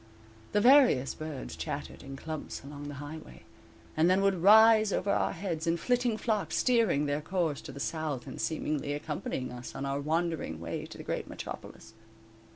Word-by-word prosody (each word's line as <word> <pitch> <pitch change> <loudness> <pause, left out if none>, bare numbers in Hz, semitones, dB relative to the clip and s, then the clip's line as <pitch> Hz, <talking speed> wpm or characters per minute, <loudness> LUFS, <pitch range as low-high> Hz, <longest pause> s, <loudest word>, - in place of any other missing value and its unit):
The 205 - +3
various 245 - +6
birds 155 -4 -6
chattered - - -5
in 135 0 -8
clumps 155 +1 -6
along 145 +1 -8
the 145 - -6
highway, 145 +2 -9 0.5
and 160 +3 +4
then 190 +2 +3
would 195 -3 +2
rise 215 +2 +7
over 200 +1 0
our - - +1
heads 170 -3 -4
in 165 +1 +2
flitting 245 +2 +1
flocks, 215 -3 -1
steering 225 - +3
their 145 +1 -1
course 165 -3 -1
to 150 - -8
the 140 - -9
south 155 -4 -3
and 130 - -7
seemingly 150 -2 -1
accompanying 145 -3 -4
us 125 0 -8
on 135 +1 -3
our 140 +1 -1
wandering 160 - -1
way 85 0 -5
to - - -11
the - - -8
great - - -3
metropolis. 110 - -8
155 Hz, 175 wpm, -30 LUFS, 140-195 Hz, 0.5 s, rise